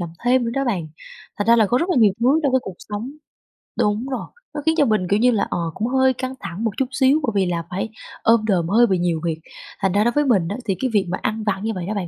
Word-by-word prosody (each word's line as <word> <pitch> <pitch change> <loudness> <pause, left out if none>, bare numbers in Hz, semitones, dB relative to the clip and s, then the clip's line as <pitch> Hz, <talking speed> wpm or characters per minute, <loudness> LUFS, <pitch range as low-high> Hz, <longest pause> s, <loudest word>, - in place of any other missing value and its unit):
làm 175 - -3 0.2
thêm 250 0 +3
nữa 230 - -2
đó 275 - 0
bạn. 185 -11 -2 0.5
Thành 205 - -1
ra 235 +1 +6
là 220 - +4
có 245 +5 +2
rất 340 - -1
là - - +1
nhiều 210 -4 +5
thứ 270 +7 +3
trong 280 -3 +1
cái 260 - +3
cuộc 190 - -8
sống 210 +4 -4 0.7
đúng 210 +4 +1
rồi, 260 - -4 0.3
nó 295 - -3
khiến 320 0 +3
cho 295 - +4
mình, 215 -6 +1
kiểu 200 - +3
như 245 +2 +4
là, 210 -3 0
ờ, - - -2 0.2
cũng 220 +7 -2
hơi 260 0 +3
căng 255 +1 -4
thẳng 175 +7 -6
một 225 - +1
chút 265 - +1
xíu 270 +3 +3
bởi 235 - 0
vì 195 -1 +3
là 170 -2 -2
phải 195 +4 -3 0.3
ôm 225 -1 +4
đồm 180 -6 +1
hơi 235 +3 +5
bị 190 - +1
nhiều 175 -2 0
việc. 165 -2 -2 0.4
Thành 190 - +1
ra 205 +3 +2
đối 240 - +2
với 295 +3 +1
mình 200 -11 +2
á 200 - -4
thì 195 -4 0
cái 260 - 0
việc 200 -3 +3
mà 185 - -1
ăn 215 0 -2
vặt 200 -2 -1
như 225 - -1
vậy 180 -2 -4
đó 215 - -2
bạn, 195 -4 -3
220 Hz, 300 wpm, -21 LUFS, 190-255 Hz, 0.7 s, ra